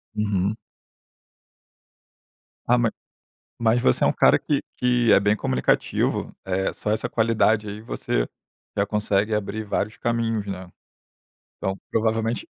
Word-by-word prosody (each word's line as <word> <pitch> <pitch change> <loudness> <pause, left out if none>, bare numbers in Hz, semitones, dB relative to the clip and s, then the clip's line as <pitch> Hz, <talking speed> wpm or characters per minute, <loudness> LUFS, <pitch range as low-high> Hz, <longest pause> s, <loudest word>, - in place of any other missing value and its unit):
Uhum. 105 -1 0 2.1
Ah, 125 - +5
ma 115 -2 +2 0.7
mas 115 +1 +4
você 65 - +3
é - - +4
um - - +3
cara - - +5
que - - -1
que 120 -2 +3
é - - +6
bem 105 +1 +2
comunicativo, 65 -8 0
eh, 95 0 0
só 105 - -2
essa 110 - -1
qualidade 110 -2 +2
aí 105 +1 -6
você - - -1 0.5
já 100 - +2
consegue 105 0 +1
abrir 105 +1 -2
vários 105 +1 -2
caminhos, 115 -3 -1
né. 95 -2 -6 0.9
Então 95 -1 -3
provavelmente 115 +1 0
105 Hz, 130 wpm, -24 LUFS, 100-115 Hz, 2.1 s, é